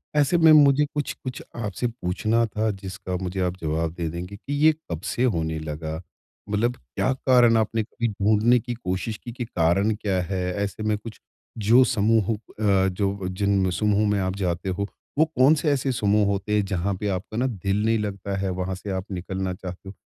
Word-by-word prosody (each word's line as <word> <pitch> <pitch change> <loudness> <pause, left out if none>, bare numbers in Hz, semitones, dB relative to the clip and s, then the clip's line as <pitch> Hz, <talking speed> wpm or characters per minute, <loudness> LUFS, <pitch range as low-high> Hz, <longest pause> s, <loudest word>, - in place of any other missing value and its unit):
ऐसे 150 +4 +3
में 160 -1 +7
मुझे 145 -1 +6
कुछ-कुछ 135 -3 -4
आपसे 105 0 -2
पूछना 115 +1 0
था, 110 0 -1
जिसका 95 -1 -6
मुझे 95 +1 -4
आप 90 0 -1
जवाब 80 +1 -1
दे 85 -1 -3
देंगे 90 +4 -6
कि 125 +7 -6
ये 160 - +8 0.2
कब 85 +1 -3
से 125 - +1
होने 80 -9 0
लगा? 80 +1 -5 0.5
मतलब 115 +4 +1
क्या 65 - -2
कारण 125 -3 +4
आपने 110 0 +1
कभी 115 +2 -3
ढूँढ़ने 110 +4 +3
की 120 +1 -5
कोशिश 105 0 -3
की 120 - -6
कि 120 0 -5
कारण 95 +3 +2
क्या 95 -3 -1
है? 90 +1 -2 0.2
ऐसे 100 +2 -4
में 105 -1 +1
कुछ, 110 +1 -10 0.4
जो 115 +5 +5
समूह 110 -3 +2
अ, 105 -2 0
जो 95 0 -2
जिन 95 0 +1
समूह 105 +2 +2
में 100 - +1
आप 95 0 -1
जाते 90 -1 -2
हो, 100 +2 -2 0.3
वो 160 - +5
कौन 150 -1 +4
से 150 0 0
ऐसे 135 -1 0
समूह 105 -2 +2
होते 100 +1 -1
हैं, 105 - +3
जहाँ 95 0 -1
पे 105 - -2
आपका 105 +4 -6
ना 130 +2 +2
दिल 100 -2 -1
नहीं 115 0 +3
लगता 100 -1 -3
है, 95 0 -1
वहाँ 95 +1 -2
से 100 +2 -8
आप 95 +2 -4
निकलना 95 0 -3
चाहते 90 +1 -8
हो? - - -9
100 Hz, 195 wpm, -24 LUFS, 95-115 Hz, 0.5 s, ये